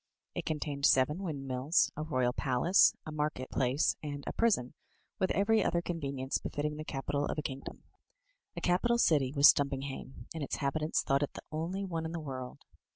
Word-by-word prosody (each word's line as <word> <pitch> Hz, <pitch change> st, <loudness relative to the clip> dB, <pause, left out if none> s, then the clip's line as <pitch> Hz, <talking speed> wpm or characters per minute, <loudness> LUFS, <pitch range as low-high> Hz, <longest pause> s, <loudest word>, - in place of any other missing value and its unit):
It -, -, -4 dB
contained 145 Hz, -2 st, 0 dB
seven 135 Hz, +6 st, +3 dB
windmills, 140 Hz, -4 st, 0 dB
a 155 Hz, -, -4 dB
royal 130 Hz, -5 st, 0 dB
palace, 135 Hz, +9 st, +4 dB
a 155 Hz, -, -6 dB
market 150 Hz, -4 st, -3 dB
place, 130 Hz, +3 st, +1 dB
and 145 Hz, -2 st, -5 dB
a -, -, -4 dB
prison, 200 Hz, -, +1 dB, 0.5 s
with 190 Hz, -, +1 dB
every 220 Hz, +2 st, +3 dB
other 170 Hz, -, +1 dB
convenience 140 Hz, -6 st, -2 dB
.befitting 150 Hz, +1 st, -3 dB
the 155 Hz, -, -5 dB
capital 145 Hz, 0 st, -2 dB
of -, -, -3 dB
a 150 Hz, -, -2 dB
kingdom. 135 Hz, -1 st, -6 dB, 0.7 s
A -, -, -3 dB
capital 215 Hz, +7 st, +2 dB
city 145 Hz, -, +3 dB
was 140 Hz, 0 st, +7 dB
Stumpinghame, 135 Hz, -3 st, -4 dB
and 160 Hz, -, -5 dB
its 140 Hz, -, -2 dB
inhabitants 155 Hz, +3 st, 0 dB
thought 135 Hz, +1 st, +2 dB
it 145 Hz, -, -2 dB
the -, -, -9 dB
only 170 Hz, +5 st, -3 dB
one 165 Hz, -3 st, -3 dB
in 160 Hz, -, -6 dB
the 170 Hz, -, -3 dB
world. 130 Hz, -4 st, -7 dB
145 Hz, 180 wpm, -32 LUFS, 135-160 Hz, 0.7 s, was